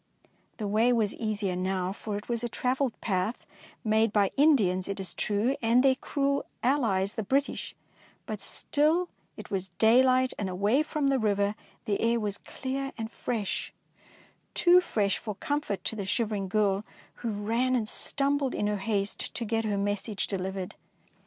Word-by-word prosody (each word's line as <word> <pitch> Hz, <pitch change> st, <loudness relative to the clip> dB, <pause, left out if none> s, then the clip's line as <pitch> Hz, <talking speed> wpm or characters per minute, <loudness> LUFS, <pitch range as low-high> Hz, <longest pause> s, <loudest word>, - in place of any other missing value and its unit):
The 215 Hz, -, -3 dB
way 220 Hz, +4 st, +3 dB
was 220 Hz, -4 st, +2 dB
easier 205 Hz, -4 st, -2 dB
now, 185 Hz, 0 st, -1 dB
for 210 Hz, 0 st, -4 dB
it 205 Hz, -, -8 dB
was 235 Hz, -1 st, -1 dB
a 240 Hz, -, -1 dB
travelled 255 Hz, +2 st, -1 dB
path, 195 Hz, +2 st, -1 dB, 0.4 s
made 220 Hz, -1 st, +3 dB
by 200 Hz, -2 st, +3 dB
Indians, 215 Hz, -, +3 dB
it 200 Hz, 0 st, -4 dB
is 190 Hz, -, -4 dB
true, 215 Hz, +6 st, 0 dB
and 235 Hz, +2 st, +4 dB
their 270 Hz, -1 st, +6 dB
cruel 280 Hz, +1 st, -1 dB, 0.2 s
allies 220 Hz, -7 st, +2 dB
the -, -, -2 dB
Brit 275 Hz, +7 st, +1 dB
ish, -, -, -6 dB, 0.5 s
but -, -, -5 dB
still 320 Hz, +4 st, +1 dB, 0.3 s
it -, -, -10 dB
was 190 Hz, -1 st, -2 dB
daylight, 255 Hz, +3 st, +5 dB
and 200 Hz, -3 st, -1 dB
away 205 Hz, +9 st, +2 dB
from 305 Hz, -2 st, 0 dB
the 270 Hz, -1 st, +2 dB
river 205 Hz, -2 st, +1 dB, 0.3 s
the 205 Hz, -3 st, 0 dB
air 230 Hz, +1 st, +2 dB
was 205 Hz, -2 st, -2 dB
clear 270 Hz, +1 st, -4 dB
and 225 Hz, 0 st, -4 dB
fresh, 220 Hz, -5 st, -3 dB, 0.4 s
— -, -, -29 dB
too 355 Hz, +1 st, +6 dB
fresh 205 Hz, -, 0 dB
for 210 Hz, -2 st, -5 dB
comfort 290 Hz, -5 st, -2 dB
to -, -, -1 dB
the 200 Hz, -3 st, -4 dB
shivering 210 Hz, -1 st, 0 dB
girl, 200 Hz, 0 st, +1 dB, 0.3 s
who 235 Hz, -, -3 dB
ran 230 Hz, +5 st, 0 dB
and 225 Hz, -4 st, 0 dB
stumbled 280 Hz, +2 st, 0 dB
in -, -, 0 dB
her 210 Hz, 0 st, 0 dB
haste 200 Hz, 0 st, -2 dB
to 235 Hz, -, -2 dB
get 225 Hz, +1 st, 0 dB
her 205 Hz, -2 st, 0 dB
message 205 Hz, +1 st, -1 dB
de 195 Hz, -, -2 dB
livered. 190 Hz, 0 st, -4 dB
220 Hz, 175 wpm, -28 LUFS, 200-255 Hz, 0.5 s, their